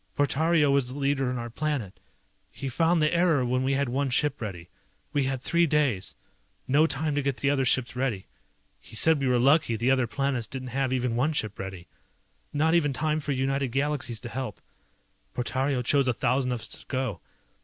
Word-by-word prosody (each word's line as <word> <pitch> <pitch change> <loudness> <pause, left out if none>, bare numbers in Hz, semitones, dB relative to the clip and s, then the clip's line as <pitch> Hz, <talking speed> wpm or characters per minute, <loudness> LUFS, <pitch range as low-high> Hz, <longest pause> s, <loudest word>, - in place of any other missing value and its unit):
Portario 150 +1 +3
was 135 -3 +2
the 135 - -7
leader 140 -2 0
on 125 - -2
our 120 -1 -5
planet. 140 -8 -3 0.5
He 135 - -6
found 165 +4 +2
the 155 - +2
error 170 -6 +3
when 125 +1 0
we 135 +1 +1
had 140 0 +1
one 135 +3 -1
ship 145 +2 0
ready. 90 -6 -6 0.5
We 145 -2 +1
had 135 0 -1
three 170 +6 +2
days. 140 -11 +1 0.5
No 150 +4 +4
time 150 +1 -1
to 145 - 0
get 140 -2 -1
the 140 - +1
other 135 -2 +1
ships 125 0 +1
ready. 125 -7 -2 0.5
He - - -14
said 160 +6 +5
we 135 - 0
were 125 -1 +3
lucky, 135 -1 +3
the 120 +4 +1
other 130 -2 +2
planets 135 -3 -1
didn't 130 0 -6
have 135 +1 -1
even 125 -2 0
one 145 +6 +1
ship 110 -8 -3
ready. 95 -2 -6 0.7
Not 160 +3 +2
even 150 -5 +2
time 155 +2 0
for 150 -1 -4
United 135 +1 0
Galaxies 135 -2 -1
to 120 - -6
help. 125 -3 -5 0.8
Portario 130 +1 -1
chose 140 0 +3
a 125 - +2
thousand 130 0 +1
of 120 -2 -3
us 115 - -4
to - - -7
go. 130 -9 -3
135 Hz, 200 wpm, -27 LUFS, 125-145 Hz, 0.8 s, said